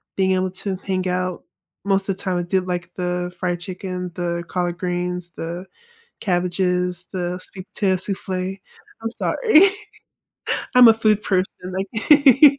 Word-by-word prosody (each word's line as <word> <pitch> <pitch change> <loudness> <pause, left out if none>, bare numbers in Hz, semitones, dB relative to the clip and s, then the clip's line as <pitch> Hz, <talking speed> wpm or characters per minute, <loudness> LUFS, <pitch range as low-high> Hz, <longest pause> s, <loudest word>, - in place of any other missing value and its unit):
being 190 -1 +2
able 185 0 +1
to 190 +1 -3
hang 185 -1 -2
out. 180 0 -2 0.4
Most 195 0 +1
of 190 - 0
the - - -9
time, 185 -2 0
I 175 - 0
did, 185 +1 0
like, 180 0 -3
the 180 0 -2
fried 175 -2 -1
chicken, 180 0 -5
the 170 -1 -2
collard 175 -1 -2
greens, 180 0 -3
the 170 +3 -5 0.6
cabbages, 180 -1 0
the 180 -1 -2
sweet 185 0 -9
potato 190 -3 +2
soufflé. 190 0 -3 0.4
I'm 225 - -2
sorry. 395 - +4 1.0
I'm 250 -2 +9
a 225 - +7
food 215 -1 +2
person, 185 -1 +2 0.3
like 270 +8 +5
185 Hz, 150 wpm, -22 LUFS, 180-195 Hz, 1.0 s, I'm